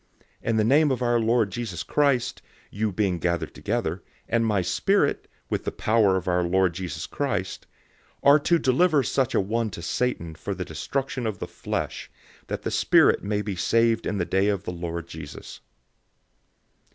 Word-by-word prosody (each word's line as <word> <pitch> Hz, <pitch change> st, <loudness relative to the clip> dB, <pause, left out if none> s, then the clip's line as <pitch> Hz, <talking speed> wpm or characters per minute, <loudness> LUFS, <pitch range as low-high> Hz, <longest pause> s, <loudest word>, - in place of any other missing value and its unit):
005:004 -, -, -4 dB
In 115 Hz, -, +2 dB
the 110 Hz, -, +3 dB
name 145 Hz, +7 st, +4 dB
of 130 Hz, -2 st, -1 dB
our 120 Hz, -1 st, +2 dB
Lord 115 Hz, -2 st, +2 dB
Jesus 100 Hz, -6 st, -4 dB
Christ, 140 Hz, -5 st, +1 dB, 0.3 s
you 105 Hz, +1 st, -1 dB
being 95 Hz, -2 st, 0 dB
gathered 85 Hz, 0 st, -1 dB
together, 105 Hz, -6 st, -2 dB, 0.3 s
and 115 Hz, 0 st, +1 dB
my 105 Hz, -4 st, +1 dB
spirit, -, -, +1 dB, 0.2 s
with -, -, -2 dB
the -, -, -2 dB
power 105 Hz, -4 st, +2 dB
of 95 Hz, -, -5 dB
our 90 Hz, 0 st, +2 dB
Lord 90 Hz, 0 st, +2 dB
Jesus 90 Hz, 0 st, -5 dB
Christ, -, -, -3 dB, 0.6 s
005:005 -, -, +6 dB
are 150 Hz, -, +6 dB
to 170 Hz, +4 st, +3 dB
deliver 150 Hz, +1 st, +3 dB
such 130 Hz, +2 st, 0 dB
a -, -, +4 dB
one 110 Hz, +3 st, 0 dB
to 85 Hz, -4 st, -8 dB
Satan 85 Hz, -4 st, -1 dB
for 95 Hz, +5 st, -5 dB
the 90 Hz, 0 st, -4 dB
destruction 125 Hz, -, -3 dB
of 105 Hz, -3 st, -3 dB
the -, -, -4 dB
flesh, -, -, -4 dB, 0.4 s
that -, -, -4 dB
the -, -, -2 dB
spirit -, -, +4 dB
may 105 Hz, 0 st, -1 dB
be 105 Hz, -2 st, -3 dB
saved 115 Hz, +4 st, +2 dB
in 105 Hz, -, -1 dB
the 90 Hz, -, 0 dB
day 95 Hz, +3 st, +1 dB
of 100 Hz, -2 st, 0 dB
the -, -, -4 dB
Lord 85 Hz, -1 st, -5 dB
Jesus. 80 Hz, -3 st, -9 dB
105 Hz, 185 wpm, -25 LUFS, 90-120 Hz, 0.6 s, 005:005